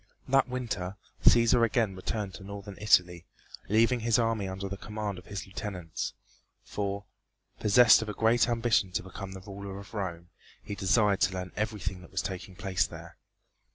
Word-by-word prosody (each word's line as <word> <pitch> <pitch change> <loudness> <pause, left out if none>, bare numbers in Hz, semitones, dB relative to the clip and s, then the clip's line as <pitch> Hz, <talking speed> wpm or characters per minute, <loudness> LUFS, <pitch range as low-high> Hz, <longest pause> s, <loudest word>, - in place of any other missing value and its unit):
That 135 0 +3
winter 115 -7 -3 0.3
Cæsar 115 0 +6
again 115 -4 +1
returned 100 +1 -3
to 95 - -10
northern 100 0 -8
Italy, 90 -4 +3 0.4
leaving 115 +4 +4
his 115 -1 +2
army 115 -4 +1
under 95 +1 -4
the 100 - -4
command 105 -1 -5
of 90 - -17
his 100 -1 -5
lieutenants, 95 -4 -5 0.5
for, 100 0 -3 0.5
possessed 115 +3 +7
of 110 - -4
a - - -3
great 115 +2 +3
ambition 115 -5 +2
to - - -1
become 95 +1 -8
the 95 - -8
ruler 100 0 -7
of 100 +2 -11
Rome, 85 -5 -4 0.3
he - - -5
desired 100 0 +2
to 95 - +3
learn 90 0 -5
everything 100 -4 -3
that 90 - -14
was 95 - -2
taking 95 -1 -6
place 90 -2 0
there. 85 0 -11
100 Hz, 170 wpm, -29 LUFS, 95-110 Hz, 0.5 s, possessed